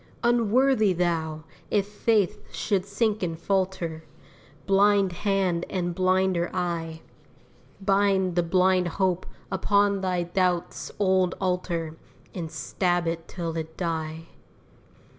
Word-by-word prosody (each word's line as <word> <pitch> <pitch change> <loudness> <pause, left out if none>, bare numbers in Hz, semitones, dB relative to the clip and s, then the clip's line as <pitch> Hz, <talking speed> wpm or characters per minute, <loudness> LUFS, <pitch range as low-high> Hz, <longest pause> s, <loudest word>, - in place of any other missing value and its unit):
Unworthy 235 -2 +3
thou! 160 -3 -1 0.3
if 200 -2 +2
faith 210 -1 0
should 195 -3 -1
sink 215 +1 0
and 165 -3 -2
falter; 180 -3 -1 0.6
Blind 200 -1 +4
hand 185 -2 0
and 175 -2 -2
blinder 185 -1 +1
eye 165 -3 -2 0.8
Bind 195 -2 +2
the 175 - +4
blind 185 +1 +2
hope 185 -2 0 0.2
upon 200 +1 +2
thy 180 -2 0
doubt's 175 0 -1
old 185 -3 +2
altar 175 -4 -2 0.4
And 170 -4 -5
stab 175 +2 0
it 165 0 -3
till 165 -3 -4
it 160 0 -5
die. 160 -2 -3
185 Hz, 110 wpm, -26 LUFS, 170-195 Hz, 0.8 s, Blind